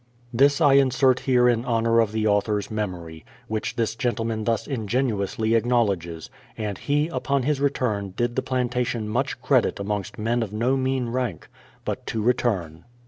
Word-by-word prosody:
This 140 +5 +4
I 145 -4 +5
Insert 135 -1 +4
here 125 -2 +3
in 120 -1 +2
honour 115 -1 +2
of 110 -3 +2
the 110 0 -1
author's 105 0 +1
memory, 90 -7 -5 0.2
which 110 -1 -3
this 115 -2 0
gentleman 115 -3 -2
thus 115 -2 0
ingenuously 110 -3 -1
acknowledges; 100 -9 0 0.3
and 105 -3 -4
he, 145 +2 +1
upon 135 -2 -1
his 140 0 0
return, 105 -9 -1
did 120 0 0
the - - +1
plantation 125 -3 -1
much 125 +6 -1
credit 130 -7 +2
amongst 100 -1 -3
men 115 +3 0
of 110 -4 -3
no 120 +5 +1
mean 130 -2 -1
rank. 120 -8 -3 0.4
But - - -4
to 110 - -2
return. 100 -10 0
115 Hz, 160 wpm, -24 LUFS, 105-130 Hz, 0.4 s, I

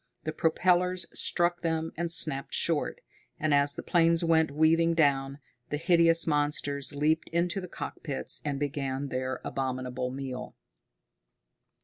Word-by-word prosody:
The 155 - -4
propellers 180 +2 +1
struck 175 0 +1
them 160 -1 -2
and 170 0 -3
snapped 140 -5 0
short, - - 0 0.4
and 155 -1 +1
as 140 0 +4
the - - -6
planes 170 -1 +2
went 160 -1 +3
weaving 165 +3 +2
down, 140 -3 +1 0.3
the 150 - -2
hideous 165 0 +4
monsters 145 -2 -1
leaped 155 +3 0
into 175 +3 -1
the 180 - -7
cockpits 145 -4 -3
and 140 -2 -3
began 140 -1 -3
their 130 0 -3
abominable 130 -1 -3
meal. 130 -1 -6
155 Hz, 130 wpm, -28 LUFS, 140-165 Hz, 0.4 s, as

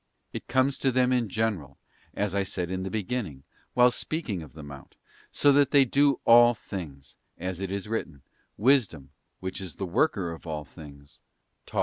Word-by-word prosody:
It - - -6
comes 130 +1 +1
to 135 - +2
them 125 0 +2
in 120 -4 0
general, 95 - -2 0.4
as 100 -2 -1
I 100 - +1
said 90 -2 -3
in 95 0 -2
the 95 - -3
beginning, 100 - -3 0.3
while 125 0 +6
speaking 125 - -3
of 75 -5 -12
the 75 0 -10
Mount, 70 -1 -11 0.4
so 145 - +4
that 140 0 +4
they 140 -2 +5
do 140 +2 +2
all 120 +1 +7
things; 75 -11 -8 0.2
as 90 +1 -4
it 95 - -3
is 100 +1 -4
written, 85 - -4 0.2
' - - -46
Wisdom, 85 - +2 0.3
which 95 +1 -5
is 95 -4 -7
the 95 - -4
worker 95 - 0
of 85 +1 -10
all 75 -2 -4
things, 70 -2 -14 0.5
taught - - -8
me. - - +4
95 Hz, 195 wpm, -27 LUFS, 80-125 Hz, 0.5 s, all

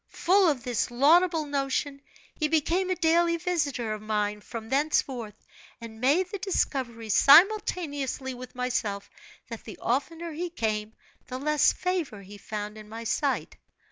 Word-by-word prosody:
Full 375 0 +3
of 265 -6 -1
this 245 -2 -1
laudable 320 +6 +4
notion, 280 0 -2 0.3
he 305 - -1
became 330 +4 +1
a 370 - +1
daily 335 0 +2
visitor 290 -10 -1
of 215 - -6
mine 210 -1 -2
from 225 +1 -8
thenceforth, 265 -6 0 0.4
and 225 -1 -10
made 330 +8 +2
the 405 - -4
discovery, 250 - -2
simultaneously 290 - +4
with 250 0 -10
myself, 220 -5 -2 0.4
that 230 - -7
the - - -10
oftener 325 +7 -2
he 345 +3 -4
came 215 -8 -2 0.3
the 255 - -5
less 300 +2 +3
favor 340 - -3
he 200 +2 -12
found 210 0 -6
in 210 0 -13
my 225 +1 -7
sight. 270 +4 -1
275 Hz, 145 wpm, -27 LUFS, 225-330 Hz, 0.4 s, laudable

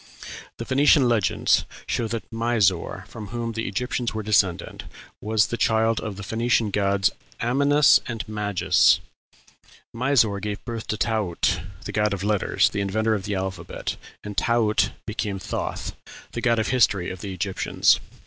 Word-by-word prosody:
The 115 - -5
Phoenician 140 +1 +4
legends 110 -6 +2 0.2
show 115 - -1
that 115 0 -5
Misor, 115 -6 0
from 110 -2 -9
whom 115 +2 -4
the 110 0 -3
Egyptians 125 -2 -2
were 110 - -3
descended, 100 -4 0 0.4
was 105 0 +2
the 120 - -4
child 110 0 +2
of 105 -3 -5
the 100 - -8
Phoenician 115 +1 +1
gods 100 0 +2 0.3
Amynus 140 +4 +4
and 115 -3 -5
Magus. 105 -3 +3 1.0
Misor 115 -5 +2
gave 105 0 -5
birth 115 -2 -5
to 110 - -2
Taaut, 100 -5 0 0.2
the - - -4
god 105 -1 +1
of 95 - -6
letters, 105 -1 +2
the 100 - -2
inventor 110 +3 0
of 100 -2 -2
the 105 -1 -2
alphabet, 95 -2 -4 0.3
and 105 -1 -7
Taaut 110 -4 +2 0.2
became 105 -2 -3
Thoth, 95 - -4 0.4
the 115 - -4
god 115 -1 +2
of 110 - 0
history 110 -7 +2
of 95 0 -8
the 100 - -5
Egyptians. 95 +1 +1
110 Hz, 155 wpm, -24 LUFS, 100-115 Hz, 1.0 s, Phoenician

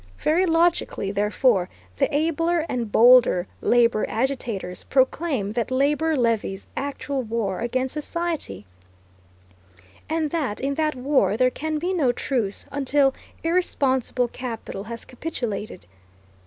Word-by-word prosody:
Very 350 +5 +2
logically, 330 - +1
therefore, 205 -1 +2 0.3
the - - +1
abler 330 +2 +1
and 235 -4 -3
bolder 235 -6 +6 0.2
labor 235 -2 +3
agitators 225 -7 -2
proclaim 265 -4 +1
that 235 +2 -2
labor 295 +5 +1
levies 225 -5 0
actual 280 0 -3
war 220 -5 -2
against 255 +2 -1
society, 305 - -4 1.4
and 315 -2 -1
that 285 -11 -2
in 275 +1 -1
that 305 0 0
war 260 -4 +1
there 255 +1 +3
can 310 +3 -3
be 355 +5 -1
no 290 -9 +2
truce 240 -5 -2
until 280 0 +2 0.3
irresponsible 265 -7 +1
capital 230 -5 -6
has 230 +1 -7
capitulated. 235 - -5
260 Hz, 115 wpm, -24 LUFS, 225-305 Hz, 1.4 s, bolder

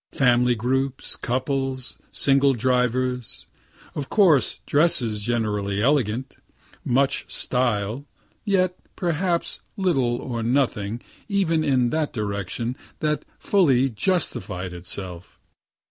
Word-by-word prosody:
Family 125 -2 +3
groups, 130 +3 +1
couples, 130 +1 -2
single 135 -1 +4
drivers 125 0 0 0.5
of 140 -2 -5
course 170 -10 +3
dresses 125 -9 +2
generally 105 -3 -1
elegant 125 -1 0 0.5
much 135 +2 0
"style," 120 +1 0 0.4
(yet 185 -3 +1 0.2
perhaps 175 0 0 0.2
little 135 -11 +1
or 120 -1 -4
nothing, 115 -3 0 0.3
even 170 -6 +1
in 130 -5 +2
that 155 -2 -1
direction, 105 +2 -3 0.2
that 150 -1 -1
fully 135 -10 +3
justified 105 - -2
itself.) 90 0 -5
130 Hz, 95 wpm, -23 LUFS, 115-145 Hz, 0.5 s, single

